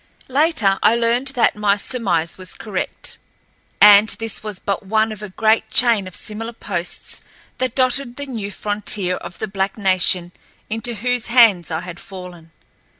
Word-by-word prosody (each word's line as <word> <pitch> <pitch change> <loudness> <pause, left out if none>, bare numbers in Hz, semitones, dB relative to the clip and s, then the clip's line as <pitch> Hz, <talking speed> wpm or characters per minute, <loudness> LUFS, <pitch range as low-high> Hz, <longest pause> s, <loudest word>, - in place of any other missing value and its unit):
Later, 260 -9 +2
I 230 - +4
learned 235 +3 +1
that 235 - +3
my 210 -1 +2
surmise 190 -7 -1
was 185 -1 -8
correct, 205 -4 -4 0.6
and 210 +1 +8
this 225 -1 -3
was 210 -3 -5
but 200 +1 -3
one 220 +2 +1
of 215 -1 -8
a 210 - -6
great 220 +4 +1
chain 230 -6 +3
of 185 - -9
similar 225 +2 -3
posts 175 -6 -5 0.4
that 255 -2 -1
dotted 255 -1 +1
the 285 - -6
new 220 -7 -5
frontier 205 -2 0
of 170 - -9
the 220 - -3
black 195 0 -2
nation 185 -3 +2 0.4
into 225 +2 -2
whose 245 +1 -1
hands 225 -9 +5
I 160 0 -2
had 175 -1 -9
fallen. 180 -4 -11
210 Hz, 160 wpm, -20 LUFS, 190-235 Hz, 0.6 s, and